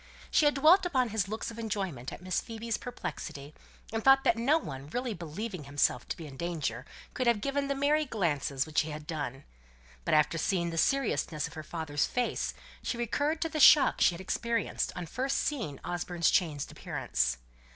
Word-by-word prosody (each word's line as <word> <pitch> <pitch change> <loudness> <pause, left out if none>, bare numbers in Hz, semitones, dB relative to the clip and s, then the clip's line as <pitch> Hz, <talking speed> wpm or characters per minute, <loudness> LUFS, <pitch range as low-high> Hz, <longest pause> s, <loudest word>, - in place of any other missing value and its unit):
She 305 - +4
had 295 - +4
dwelt 320 +8 +6
upon 260 -9 +1
his 205 -3 0
looks 220 +3 -4
of 230 - -9
enjoyment 190 - -3
at - - -9
Miss 185 0 0
Phoebe's 225 -1 -4
perplexity, 150 - -6 0.4
and 225 0 -1
thought 270 0 +6
that - - +4
no 255 +7 +3
one 140 - -7
really 245 +4 -2
believing 175 0 -6
himself 140 -3 +1
to - - -4
be 165 - -8
in 135 -3 -10
danger 150 -8 -3 0.3
could 255 - -1
have 235 -3 +4
given 280 +5 -1
the 280 - 0
merry 295 +3 +2
glances 150 - -1
which 155 -1 +1
he 155 - -5
had 150 0 -7
done; 145 -4 -4 0.6
but - - +2
after 155 +2 +3
seeing 170 0 0
the 165 - -5
seriousness 220 - +1
of - - -8
her 155 - -6
father's 155 -2 -2
face, 245 -1 -1 0.3
she 235 - -3
recurred 290 +7 0
to 325 - -2
the 310 - -3
shock 295 +1 +7
she 175 - +5
had 170 - -8
experienced 230 +4 -1
on 180 - -4
first 260 - -1
seeing 220 - -2
Osborne's 175 -1 0
changed 155 -6 0
appearance. 60 0 -1
190 Hz, 195 wpm, -30 LUFS, 150-250 Hz, 0.6 s, shock